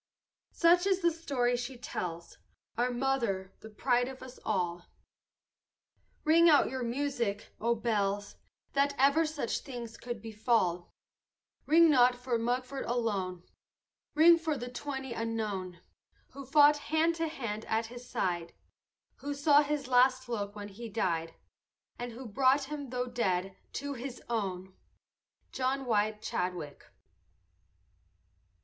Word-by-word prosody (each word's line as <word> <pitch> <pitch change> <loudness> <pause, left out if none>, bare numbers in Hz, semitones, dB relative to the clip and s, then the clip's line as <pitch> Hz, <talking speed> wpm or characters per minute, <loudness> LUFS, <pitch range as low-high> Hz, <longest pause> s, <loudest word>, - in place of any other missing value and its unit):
Such 350 +2 +4
is 385 -1 +2
the 340 -1 +3
story 270 -7 0
she 245 +1 -5
tells, 170 -7 -6 0.4
Our 240 +2 +1
mother, 240 -7 -1
the 220 - -11
pride 240 +3 +1
of 265 0 -8
us 260 -1 -11
all. 175 -4 -2 1.4
Ring 335 +2 +6
out 295 - +5
your 260 -1 -3
music, 240 -4 -2
O 235 +1 +2
bells, 205 -3 -1 0.4
That 280 0 +2
ever 280 +4 +4
such 295 -7 -2
things 240 -4 -8
could 240 -2 -6
befall! 210 -5 0 0.8
Ring 330 +2 +7
not 250 -2 +5
for 245 -1 -2
Mugford 250 +3 -2
alone, 200 -7 -2 0.7
Ring 335 +2 +7
for 320 -3 -1
the 245 0 -5
twenty 265 -1 -5
unknown, 210 -6 -3 0.5
Who 275 0 -9
fought 295 +1 +6
hand 315 +3 +1
to 325 0 0
hand 230 -8 -4
at 225 +1 0
his 245 +2 -10
side, 175 -7 -2 0.6
Who 285 0 -4
saw 285 +1 +5
his 290 -2 -2
last 255 0 +4
look 205 -3 -3
when 205 0 -7
he 230 +4 -8
died, 170 -6 -1 0.6
And 245 -1 -5
who 255 +3 -9
brought 260 +5 +3
him, 285 -1 -6
though 250 0 -2
dead, 195 -6 -1 0.2
to 285 0 -3
his 250 0 -6
own! 190 -5 -3 0.8
JOHN 265 +1 -1
WHITE 215 -2 0
CHADWICK. 180 -8 -4
245 Hz, 130 wpm, -31 LUFS, 210-275 Hz, 1.4 s, Ring